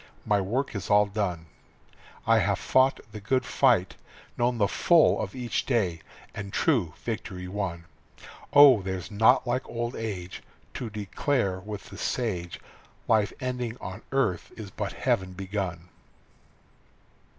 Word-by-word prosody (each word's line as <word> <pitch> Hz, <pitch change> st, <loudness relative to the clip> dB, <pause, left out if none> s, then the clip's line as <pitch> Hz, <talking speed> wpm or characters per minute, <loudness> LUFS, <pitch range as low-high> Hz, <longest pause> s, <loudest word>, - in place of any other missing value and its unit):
My 105 Hz, -2 st, +2 dB
work 125 Hz, +9 st, -2 dB
is 100 Hz, -, -5 dB
all 105 Hz, 0 st, +5 dB
done. 100 Hz, -5 st, -3 dB, 0.8 s
I -, -, +5 dB
have -, -, +1 dB
fought 130 Hz, +1 st, +2 dB
the 105 Hz, -, -7 dB
good 130 Hz, +4 st, 0 dB
fight, 115 Hz, -9 st, +2 dB, 0.4 s
known 120 Hz, 0 st, +1 dB
the 100 Hz, -3 st, +3 dB
full 170 Hz, -, +4 dB
of -, -, -5 dB
each 120 Hz, -2 st, -2 dB
day, 95 Hz, -, 0 dB, 0.3 s
And 100 Hz, -2 st, -6 dB
true 110 Hz, -, +1 dB
victory 95 Hz, -5 st, -4 dB
won. 90 Hz, -3 st, -4 dB, 0.7 s
Oh, 140 Hz, -6 st, +8 dB
there's 95 Hz, +1 st, -5 dB
naught 110 Hz, +6 st, +4 dB
like 125 Hz, +1 st, -2 dB
old 120 Hz, 0 st, -3 dB
age 95 Hz, -5 st, -5 dB, 0.3 s
To 120 Hz, -, -5 dB
declare 105 Hz, 0 st, -1 dB
with 105 Hz, +1 st, -8 dB
the -, -, -9 dB
sage, 90 Hz, -9 st, -2 dB, 0.5 s
Life 110 Hz, -2 st, +3 dB
ending 125 Hz, -2 st, -3 dB
on 95 Hz, 0 st, -7 dB
earth 120 Hz, -11 st, 0 dB
is 105 Hz, -4 st, -8 dB
but -, -, -4 dB
heaven 95 Hz, 0 st, 0 dB
begun. 95 Hz, -2 st, -4 dB
105 Hz, 140 wpm, -27 LUFS, 95-120 Hz, 0.8 s, Oh